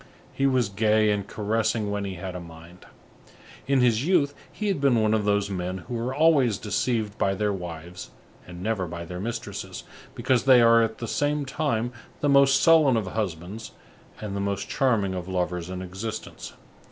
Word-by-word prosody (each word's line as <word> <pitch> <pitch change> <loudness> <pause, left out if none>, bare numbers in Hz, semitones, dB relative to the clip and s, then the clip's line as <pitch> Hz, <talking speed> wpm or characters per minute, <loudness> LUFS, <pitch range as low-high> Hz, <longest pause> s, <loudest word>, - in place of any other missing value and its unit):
He 135 - +1
was 130 -4 +2
gay, 105 +1 +2
and 100 -1 -2
caressing 110 0 -1
when 100 0 -2
he 95 -1 -5
had 90 +1 -6
a - - -4
mind. 85 +1 -13 0.8
In 135 -1 +3
his 120 -1 +3
youth 155 -4 +2 0.2
he 210 - -4
had 195 -8 0
been 135 -5 +4
one 110 0 +2
of 110 -2 +1
those 100 -1 +1
men 90 0 -3
who 120 - -4
are 120 +2 -2
always 145 - +4
deceived 110 0 -2
by 95 0 +1
their 105 +1 0
wives 85 -1 -7 0.4
and 90 0 -9
never 105 -4 -1
by 85 0 -6
their 90 +1 -7
mistresses, 115 +3 -5 0.3
because 130 -2 +1
they 130 -2 +7
are, 115 0 +6
at 110 -1 -1
the 115 - -5
same 145 +3 0
time, 125 -5 -1 0.3
the 145 - +1
most 140 -1 +5
sullen 155 -7 +5
of 110 - -1
husbands 95 +1 -5 0.5
and 105 -2 -5
the 100 - -2
most 100 0 -2
charming 115 -9 +1
of 90 -1 -5
lovers 90 -1 -2
in 95 0 -5
existence. 100 +5 -7
110 Hz, 185 wpm, -25 LUFS, 95-125 Hz, 0.8 s, they